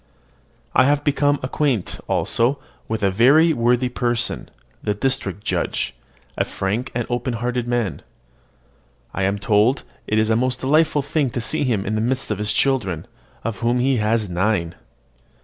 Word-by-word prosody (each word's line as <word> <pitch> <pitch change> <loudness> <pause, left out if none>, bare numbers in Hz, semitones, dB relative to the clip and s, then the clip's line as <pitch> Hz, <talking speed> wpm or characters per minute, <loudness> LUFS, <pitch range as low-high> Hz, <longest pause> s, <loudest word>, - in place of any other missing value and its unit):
I - - +5
have 145 +1 +2
become 145 -1 +2
acquainted, 130 -5 -1
also, 120 +5 +1 0.3
with 110 -1 -3
a 100 - +3
very 140 - +5
worthy 120 0 +2
person, 120 -1 -1 0.3
the 105 - -1
district 105 -4 -1
judge, - - -1 0.4
a - - +1
frank 105 +6 -3
and 120 -2 -1
open 120 0 -2
hearted 120 +1 -2
man. 120 -6 -1 1.1
I - - -3
am 100 +1 0
told 105 +5 +2 0.2
it 110 - +1
is 110 +1 +2
a - - +4
most 125 +2 0
delightful 150 +1 +3
thing 145 -1 0
to 120 - -4
see 120 - 0
him 110 -6 0
in 105 - -2
the 110 - 0
midst 130 +1 -1
of 105 - -2
his 105 0 -1
children, 105 - 0 0.4
of 115 -1 -3
whom 120 +1 +1
he 130 +1 +2
has 110 0 +1
nine. 90 -1 0
120 Hz, 165 wpm, -21 LUFS, 105-130 Hz, 1.1 s, I